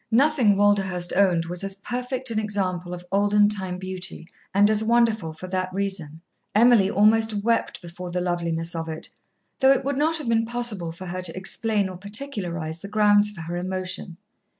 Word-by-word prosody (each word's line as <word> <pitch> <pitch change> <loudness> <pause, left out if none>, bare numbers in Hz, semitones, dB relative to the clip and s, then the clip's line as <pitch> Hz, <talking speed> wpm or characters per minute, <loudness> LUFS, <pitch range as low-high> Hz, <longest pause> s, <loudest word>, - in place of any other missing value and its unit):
Nothing 255 -3 +4
Walderhurst 195 -3 +2
owned 180 -4 +3
was 175 +2 -4
as 195 0 -3
perfect 250 +4 -4
an 220 - 0
example 185 -4 -2
of 180 0 -7
olden 205 +1 +4
time 190 -3 -2
beauty, 185 -2 -5 0.2
and 200 +1 +5
as 215 0 +2
wonderful 225 -6 +2
for 160 +3 -9
that 185 0 -2
reason. 185 -5 -3 0.3
Emily 225 -3 +5
almost 215 0 +3
wept 230 +1 0
before 175 +1 -8
the 180 +1 -2
loveliness 170 -2 -2
of 165 -1 -4
it, 160 0 -6 0.5
though 265 0 +6
it 270 -1 +2
would 280 0 -1
not 320 +2 +2
have 300 -5 -6
been 225 -1 +2
possible 230 -8 -3
for 180 +3 -9
her 185 +1 -4
to 180 -1 -3
explain 205 +1 0
or 185 -1 -8
particularise 185 - -3
the - - -7
grounds 210 0 +4
for 200 -5 -9
her 170 +2 -5
emotion. 185 0 -5
195 Hz, 180 wpm, -24 LUFS, 180-220 Hz, 0.5 s, though